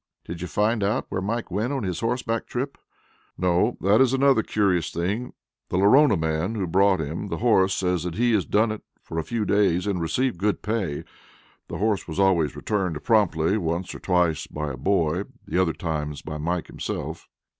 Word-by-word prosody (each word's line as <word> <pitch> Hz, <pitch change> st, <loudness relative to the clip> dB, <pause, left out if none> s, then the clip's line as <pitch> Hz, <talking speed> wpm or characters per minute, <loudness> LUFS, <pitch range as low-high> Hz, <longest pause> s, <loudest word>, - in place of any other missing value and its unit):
"Did 85 Hz, 0 st, -7 dB
you 90 Hz, -, -3 dB
find 105 Hz, +3 st, +1 dB
out 105 Hz, +6 st, 0 dB
where 95 Hz, -, -2 dB
Mike 115 Hz, +2 st, -3 dB
went 110 Hz, +8 st, -1 dB
on 135 Hz, -4 st, -2 dB
his 90 Hz, -3 st, -2 dB
horseback 115 Hz, -1 st, -1 dB
trip?" 135 Hz, +3 st, -4 dB, 0.6 s
"No, 90 Hz, +6 st, +1 dB
that 100 Hz, +5 st, +4 dB
is 130 Hz, -1 st, +4 dB
another 135 Hz, -3 st, +4 dB
curious 95 Hz, -7 st, +1 dB
thing. 100 Hz, +9 st, -3 dB, 0.4 s
The -, -, -1 dB
Lorona 105 Hz, +4 st, +5 dB
man 80 Hz, +6 st, -1 dB
who 100 Hz, -4 st, -1 dB
brought 95 Hz, +2 st, +3 dB
him 80 Hz, +6 st, -4 dB
the -, -, -3 dB
horse 100 Hz, -5 st, +3 dB
says 90 Hz, -2 st, 0 dB
he 120 Hz, +7 st, +1 dB
has 105 Hz, -4 st, +3 dB
done 110 Hz, +1 st, +2 dB
it 110 Hz, -, -5 dB, 0.2 s
for 80 Hz, -, -4 dB
a -, -, -1 dB
few 115 Hz, +4 st, -2 dB
days 100 Hz, -4 st, +2 dB
and 100 Hz, -4 st, -1 dB
received 120 Hz, +4 st, 0 dB
good 105 Hz, +2 st, 0 dB
pay. 100 Hz, -9 st, -2 dB, 0.6 s
The -, -, -5 dB
horse 105 Hz, -3 st, 0 dB
was 80 Hz, +3 st, -5 dB
always 90 Hz, -7 st, +3 dB
returned 90 Hz, -8 st, -2 dB
promptly, 100 Hz, -4 st, +2 dB
once 85 Hz, 0 st, -2 dB
or -, -, -8 dB
twice 85 Hz, -4 st, +1 dB
by 75 Hz, -1 st, -4 dB
a -, -, -5 dB
boy; 85 Hz, +4 st, 0 dB, 0.2 s
the 90 Hz, -, +1 dB
other 85 Hz, -3 st, +1 dB
times 75 Hz, -3 st, -4 dB
by 75 Hz, 0 st, -6 dB
Mike 85 Hz, +3 st, -1 dB
himself." -, -, -5 dB
95 Hz, 190 wpm, -24 LUFS, 85-110 Hz, 0.6 s, Lorona